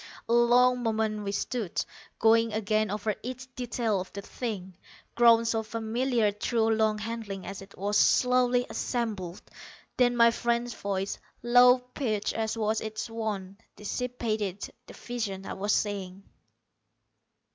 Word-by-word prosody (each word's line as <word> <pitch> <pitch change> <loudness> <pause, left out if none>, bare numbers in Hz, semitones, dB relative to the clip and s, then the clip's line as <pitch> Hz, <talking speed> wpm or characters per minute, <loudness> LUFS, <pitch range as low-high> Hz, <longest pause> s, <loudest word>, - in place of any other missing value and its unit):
A 230 - +1
long 245 +1 +5
moment 220 -2 -1
we 200 - -2
stood, 210 -1 -2 0.3
going 225 0 +4
again 215 0 +1
over 210 +1 -1
each 255 +1 -7
detail 235 -5 -1
of 185 - -9
the 200 - -5
thing, 195 -7 -5 0.4
grown 230 -1 +5
so 225 -1 +1
familiar 230 +1 0
through 225 +2 0
long 220 -1 +2
handling 215 -3 -5
as 195 0 -7
it 195 - -14
was 205 +2 +1
slowly 250 0 +3
assembled. 210 -8 -3 0.5
Then 245 -1 +3
my 235 0 +6
friend's 235 0 -1
voice, 195 -1 -3 0.2
low 245 +1 +7
pitched 250 -4 -3
as 220 0 -2
was 215 0 0
its 220 +1 -5
wont, 210 -3 -4
dissipated 215 -3 -3
the - - -11
visions 210 -6 -4
I - - -4
was 205 +2 -1
seeing. 195 -2 -3
220 Hz, 135 wpm, -28 LUFS, 205-240 Hz, 0.5 s, low